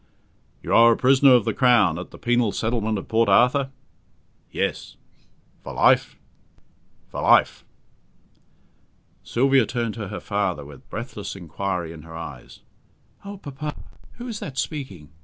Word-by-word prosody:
"You - - -2
are 115 0 +7
a - - -3
prisoner 135 +1 +5
of 120 - +2
the - - 0
Crown 115 -10 +3
at 90 - -8
the - - -13
penal 120 -3 +1
settlement 110 -1 -1
of 95 - -7
Port 115 -1 +2
Arthur?" 125 +7 +4 0.8
"Yes." - - -3 0.6
"For - - -8
life?" - - +3 0.9
"For - - -5
life." - - +3 1.6
Sylvia 135 0 +2
turned 120 -3 -2
to 105 -3 -6
her 100 +2 -6
father 100 -7 -2
with 70 -1 -14
breathless 105 -4 -6
inquiry 90 -1 -4
in 80 - -11
her 80 +1 -12
eyes. 75 -6 -9 0.6
"Oh, 200 0 -8
papa! 150 -3 -6 0.4
who 245 +1 -9
is 225 -4 -5
that 135 -3 -7
speaking? 130 - -5
115 Hz, 140 wpm, -23 LUFS, 95-130 Hz, 1.6 s, are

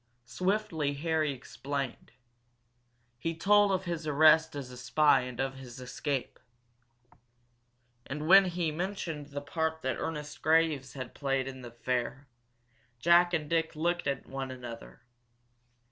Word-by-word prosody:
Swiftly 175 - -1
Harry 155 0 0
explained. 135 0 -5 1.1
He 165 +7 -2
told 205 +4 +4
of 190 -1 0
his 170 -2 -3
arrest 155 +1 +5
as 135 -3 -6
a 125 - -10
spy 130 +3 +4
and 125 -1 -7
of 135 0 -2
his 130 -1 -10
escape. 130 +1 -3 1.7
And 150 +3 -4
when 195 +2 +8
he 175 -3 -1
mentioned 165 -3 -4
the 145 0 -6
part 160 +2 -2
that 130 -2 -1
Ernest 150 -2 -5
Graves 155 -5 +2
had 130 -3 -7
played 135 -2 -1
in 130 -1 -7
the 120 - -8
affair, 125 +3 -3 0.7
Jack 170 +6 +5
and 160 -4 -1
Dick 165 0 0
looked 175 +1 0
at 140 - -2
one 135 0 -5
another. 115 - -9
150 Hz, 135 wpm, -30 LUFS, 130-165 Hz, 1.7 s, when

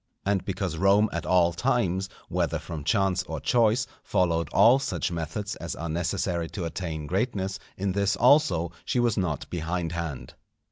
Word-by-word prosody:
And 100 -1 +1
because 95 -4 -3
Rome 100 +4 +4
at 85 -1 -3
all 85 -2 +4
times, 95 -4 0 0.2
whether - - 0
from 80 -3 -7
chance 95 +3 +2
or 80 -3 -5
choice, 115 - +2 0.2
followed 85 -3 +1
all 115 +7 +6
such 135 -8 -2
methods 85 +5 -4
as 85 - -5
are 85 - -5
necessary 85 0 -1
to 90 - -2
attain 80 -3 -4
greatness, 95 - -1 0.2
in 95 0 -1
this 100 +1 +1
also 125 - +4
she 125 - 0
was 120 -2 +2
not 85 -8 -2
behindhand. 85 -5 -3
90 Hz, 155 wpm, -26 LUFS, 85-100 Hz, 0.2 s, all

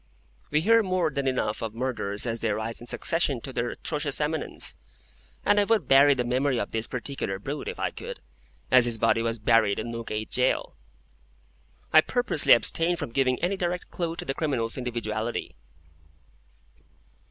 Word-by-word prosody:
We 150 +1 +2
hear 230 +5 +5
more 185 -5 0
than 140 0 -2
enough 120 -5 -1
of 115 -1 -4
murderers 115 -5 -2
as 115 -1 -2
they 115 - -1
rise 110 +2 -3
in 120 - -10
succession 150 -5 0
to 135 - -7
their 120 0 -1
atrocious 150 0 -2
eminence, 150 +1 -1 0.7
and 205 - +4
I - - +5
would 225 0 +1
bury 140 +1 +6
the 125 - 0
memory 130 +1 0
of 100 - -3
this 110 0 -2
particular 125 -6 -4
brute, 140 +9 -5
if - - -5
I - - -1
could, - - -8 0.5
as 130 -1 +7
his 120 -2 -1
body 115 +1 +2
was 115 0 -1
buried, 110 -2 +3
in 120 - -4
Newgate 110 -2 -5
Jail. 130 +1 0 1.2
I 155 - +9
purposely 245 - +3
abstain 165 +9 +3
from 140 - -5
giving 130 0 +1
any 185 +3 +1
direct 180 -1 -3
clue 170 -2 -3
to - - -6
the 135 - -2
criminal's 130 -7 -1
individuality. 120 -2 -3
130 Hz, 170 wpm, -26 LUFS, 115-150 Hz, 1.2 s, I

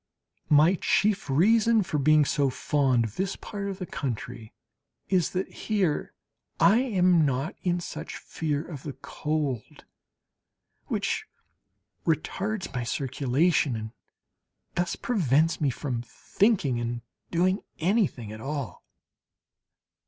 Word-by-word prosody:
My 155 +5 +5
chief 205 -5 +2
reason 220 - +4
for 155 -4 -2
being 155 +1 +5
so 140 -1 +2
fond 130 -2 +1
of 110 - -7
this 190 0 -1
part 200 -2 -5
of 195 - -5
the 185 - -5
country 125 -7 -5 0.6
is 185 -4 +2
that 185 +1 -1
here 195 -8 -1 0.4
I 220 +4 +6
am 185 -9 +3
not 140 - 0
in 175 -2 0
such 175 - -6
fear 150 -2 -3
of 150 -6 -7
the 145 - -6
cold 150 -6 -3 1.0
which - - -1 0.8
retards 195 +3 -1
my 125 -2 -2
circulation, 140 +1 +1
and 110 0 -5 0.8
thus 175 0 -1
prevents 165 - +1
me 145 - +3
from 125 -1 -3
thinking 150 - +1
and 120 0 -3 0.3
doing 185 +3 +2 0.2
anything 165 - 0
at 110 0 -8
all. 135 -8 -5
155 Hz, 120 wpm, -27 LUFS, 135-185 Hz, 1.0 s, I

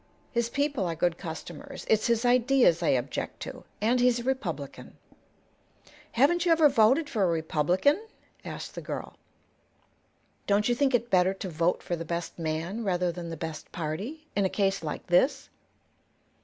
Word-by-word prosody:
His 235 -1 0
people 280 -7 0
are 165 - -2
good 170 +1 0
customers. 160 -1 -8
It's 220 -1 +3
his 235 0 +1
ideas 245 -7 +4
I 165 - 0
object 125 -2 -1
to, - - -7 0.2
and 235 +4 +3
he's 245 -1 +4
a - - -5
Republican." 175 - -4 1.2
"Haven't 295 +8 +3
you 350 - +2
ever 320 -2 +6
voted 265 +5 +4
for 220 - -2
a 190 - +4
Republican?" 175 - +1 0.4
asked - - -7
the - - -6
girl. - - -6 1.3
"Don't 205 +1 +3
you 245 - +3
think 265 +1 +2
it 240 0 -1
better 185 +1 +4
to 190 - -5
vote 165 +2 0
for 175 - -2
the 165 - -5
best 170 +1 -4
man, 165 +7 -3
rather 180 -3 +1
than 170 0 -7
the 165 - -6
best 160 0 -6
party, 195 - -5
in 200 - +2
a 190 - +2
case 195 -2 0
like 155 -2 -5
this?" 265 +11 +2
195 Hz, 170 wpm, -28 LUFS, 170-250 Hz, 1.3 s, ever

